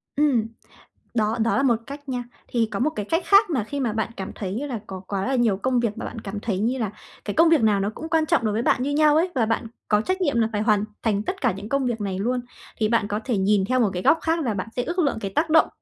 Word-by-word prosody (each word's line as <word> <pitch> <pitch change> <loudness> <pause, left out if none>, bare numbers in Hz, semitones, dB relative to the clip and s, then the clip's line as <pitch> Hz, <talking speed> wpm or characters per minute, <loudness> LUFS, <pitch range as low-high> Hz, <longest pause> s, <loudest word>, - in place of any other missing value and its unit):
Ừm, 270 -7 +2 0.7
đó, 220 0 +1
đó 230 - +2
là 275 - +2
một 245 -4 +4
cách 285 0 -9
nha. 245 -1 -2 0.2
Thì 230 -2 +1
có - - -3
một 275 +6 +2
cái 210 -10 -5
cách 330 - 0
khác 400 -1 +5
mà 260 -9 0
khi 285 +6 -5
mà 240 -5 0
bạn 220 +1 -2
cảm 190 -1 -5
thấy, 190 -3 -4
như 250 +8 -3
là, 245 -5 -4
có 190 -1 -6
quá 195 +1 -2
là 270 - +1
nhiều 230 -5 +2
công 250 +4 +1
việc, 230 -3 -1
mà - - -5
bạn 225 - -7
cảm 205 0 -5
thấy 205 -3 -2
như 240 +5 0
là 220 -6 -2 0.3
cái 205 - -2
công 330 0 +5
việc 325 -6 +4
nào 210 -2 +3
nó 195 +1 0
cũng 320 +1 -7
quan 320 -1 +2
trọng 275 - +2
đối 210 - +1
với 225 - 0
bạn 250 0 +2
như 285 - -1
nhau 300 0 +4
ấy 335 +4 +3
và 230 -3 +2
bạn 225 +1 -1 0.2
có 210 -1 +3
trách 370 - -2
nhiệm 280 -8 +1
là 225 -1 +2
phải 210 -1 -1
hoàn 210 -2 +3 0.2
thành 210 -2 +1
tất 375 - -4
cả 250 - +3
những 200 +3 -8
công 275 -1 +1
việc 235 -3 -2
này 190 -2 -2
luôn, 250 +5 0 0.4
thì 215 - +1
bạn 230 -3 +2
có 205 0 -2
thể 240 -6 0
nhìn 195 0 +2
theo 255 +4 +1
một 225 -4 +3
cái 180 0 -3
góc 325 - +4
khác 325 0 0
là 235 -5 0
bạn 195 +1 -4
sẽ 245 - 0
ước 350 +5 -3
lượng 285 -8 +1
cái 195 - -3
tác 320 +1 +1
động, 320 0 +5
235 Hz, 305 wpm, -24 LUFS, 210-285 Hz, 0.7 s, khác